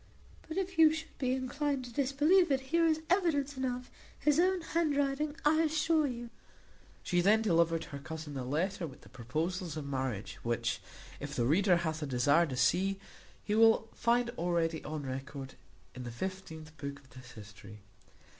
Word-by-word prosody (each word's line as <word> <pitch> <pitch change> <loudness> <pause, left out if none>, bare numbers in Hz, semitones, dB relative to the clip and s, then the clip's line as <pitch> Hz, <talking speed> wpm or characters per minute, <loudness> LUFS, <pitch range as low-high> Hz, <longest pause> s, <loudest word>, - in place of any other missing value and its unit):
But 320 +2 -5
if 375 -3 -2
you 315 -1 +8
should 315 +1 -6
be 255 -2 +1
inclined 265 +1 -2
to 240 - -10
disbelieve 295 +8 +3
it, 270 - +3
here 335 0 +5
is 315 -1 +1
evidence 315 -7 +1
enough, 250 -1 -3 0.3
his 300 +1 +3
own 370 +1 +3
handwriting, 295 -3 0
I 315 +2 +4
assure 315 0 +2
you." 240 -2 -6 0.7
She 175 -1 +1
then 215 +4 +4
delivered 165 -4 +2
her 140 - -8
cousin 155 +2 -7
the 135 -2 -4
letter 165 +7 -1
with 135 - -13
the - - -16
proposals 160 - -3
of 150 - -5
marriage, 130 -7 -3
which, 115 -1 -1 0.4
if - - -6
the 120 - +1
reader 180 - +4
hath 160 -2 -2
a 150 - -2
desire 140 +6 +3
to 130 -3 -5
see, 190 +10 +2 0.4
he 210 - -2
will 225 0 +5
find 235 0 +1
already 170 -2 0
on 155 -1 -5
record 135 +1 -6 0.4
in 125 - -8
the 120 - -5
XVth 160 +2 -6
book 140 0 -5
of 135 -3 -21
this 130 0 -13
history. 105 -1 -12
190 Hz, 175 wpm, -32 LUFS, -, 0.7 s, you